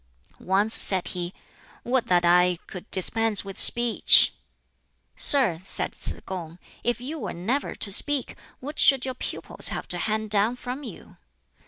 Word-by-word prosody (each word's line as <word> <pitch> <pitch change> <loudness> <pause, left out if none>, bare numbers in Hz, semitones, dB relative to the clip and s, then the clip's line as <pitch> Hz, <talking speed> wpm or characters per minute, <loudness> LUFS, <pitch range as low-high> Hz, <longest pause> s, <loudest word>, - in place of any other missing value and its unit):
Once 200 +4 0
said 190 -2 +3
he, 175 -1 -5 0.5
"Would 250 0 -2
that 175 -1 +1
I 180 +1 +3
could 185 +2 -11
dispense 215 +2 0
with 195 -1 -6
speech!" 240 -1 +5 0.8
"Sir," 240 - +5
said 190 - -2
Tsz - - -1
kung, 170 -3 -8 0.3
"if 240 -1 -2
you 295 +6 -7
were - - -6
never 230 +12 -3
to 200 - -4
speak, 285 +6 +1 0.2
what 290 +4 -7
should 270 -2 +4
your 260 - -4
pupils 250 - -2
have - - -6
to - - -5
hand 215 -1 -3
down 215 +3 +1
from 250 +2 -8
you?" 235 -10 -12
215 Hz, 155 wpm, -24 LUFS, 185-250 Hz, 0.8 s, speech